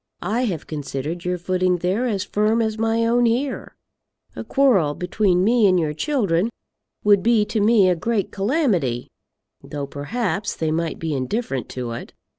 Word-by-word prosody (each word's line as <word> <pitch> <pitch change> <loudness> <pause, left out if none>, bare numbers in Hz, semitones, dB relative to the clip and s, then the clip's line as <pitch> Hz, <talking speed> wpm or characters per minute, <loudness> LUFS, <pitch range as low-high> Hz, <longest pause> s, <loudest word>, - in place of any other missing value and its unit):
I 225 +8 0
have 175 -9 -3
considered 150 +3 -5
your 180 0 0
footing 185 +1 +1
there 190 +8 0
as 205 -5 -1
firm 215 +3 +1
as 220 -1 -1
my 225 +1 +1
own 240 +1 +3
here. 255 +4 -2 0.6
A - - -5
quarrel 205 - +2
between 180 0 +1
me 225 0 +4
and 185 -1 +3
your 155 -2 -1
children 205 - 0 0.5
would 205 -2 +5
be 225 0 +3
to 215 +1 -2
me 210 -2 +5
a 180 - +3
great 210 +3 -1
calamity, 195 - 0 0.5
though, 145 -1 -5
perhaps, 200 - -3
they 160 -1 -1
might 165 0 -1
be 160 -2 -3
indifferent 135 - -2
to 125 -2 -5
it. 115 - -7
195 Hz, 165 wpm, -22 LUFS, 165-225 Hz, 0.6 s, would